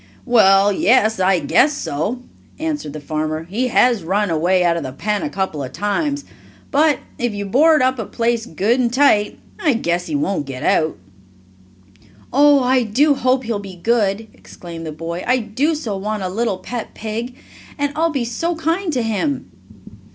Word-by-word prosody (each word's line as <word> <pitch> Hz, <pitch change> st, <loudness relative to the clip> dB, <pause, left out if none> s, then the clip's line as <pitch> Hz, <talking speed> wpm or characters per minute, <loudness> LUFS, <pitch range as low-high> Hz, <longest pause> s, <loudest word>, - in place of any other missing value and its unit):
"Well, 200 Hz, -4 st, +5 dB
yes, 220 Hz, 0 st, +3 dB
I 185 Hz, 0 st, +3 dB
guess 295 Hz, -, +3 dB
so," 220 Hz, -, -3 dB, 0.3 s
answered 300 Hz, -, -3 dB
the 155 Hz, -, -6 dB
farmer. 155 Hz, +1 st, -3 dB
"He 210 Hz, +10 st, -2 dB
has 245 Hz, -2 st, +3 dB
run 200 Hz, +3 st, 0 dB
away 175 Hz, +3 st, +2 dB
out 170 Hz, -1 st, +2 dB
of 170 Hz, -, -2 dB
the 130 Hz, -, -5 dB
pen 205 Hz, +9 st, -2 dB
a 305 Hz, -, -2 dB
couple 190 Hz, -, -3 dB
of 130 Hz, -, -7 dB
times, 285 Hz, +8 st, -1 dB, 0.5 s
but 300 Hz, 0 st, +3 dB, 0.2 s
if 240 Hz, -3 st, -1 dB
you 205 Hz, 0 st, -4 dB
board 300 Hz, +7 st, +4 dB
up 260 Hz, -1 st, +1 dB
a 220 Hz, -, -3 dB
place 235 Hz, -1 st, -1 dB
good 210 Hz, +10 st, 0 dB
and 240 Hz, -2 st, +1 dB
tight, 245 Hz, -6 st, +3 dB, 0.2 s
I 300 Hz, -5 st, +2 dB
guess 175 Hz, -4 st, -1 dB
he -, -, -3 dB
won't 200 Hz, -, -1 dB
get 130 Hz, -2 st, -6 dB
out." 155 Hz, -1 st, +1 dB, 1.4 s
"Oh, 285 Hz, 0 st, +5 dB
I 255 Hz, +1 st, +3 dB
do 260 Hz, +7 st, +3 dB
hope 255 Hz, -1 st, +1 dB
he'll 225 Hz, -3 st, -2 dB
be 195 Hz, -2 st, -9 dB
good!" 215 Hz, +2 st, 0 dB
exclaimed 165 Hz, -2 st, -10 dB
the -, -, -4 dB
boy. 165 Hz, +3 st, -5 dB
"I 250 Hz, -, +3 dB
do 255 Hz, +8 st, -1 dB
so 235 Hz, -10 st, -4 dB
want 210 Hz, +1 st, -3 dB
a 185 Hz, -, -2 dB
little 215 Hz, 0 st, -1 dB
pet 230 Hz, +5 st, -7 dB
pig, 230 Hz, +3 st, -5 dB, 0.4 s
and 285 Hz, -1 st, -1 dB
I'll 330 Hz, +2 st, +2 dB
be 275 Hz, -6 st, -2 dB
so 330 Hz, +9 st, -2 dB
kind 330 Hz, +3 st, -1 dB
to 250 Hz, -3 st, 0 dB
him!" 225 Hz, +6 st, -2 dB
225 Hz, 180 wpm, -19 LUFS, 190-265 Hz, 1.4 s, Well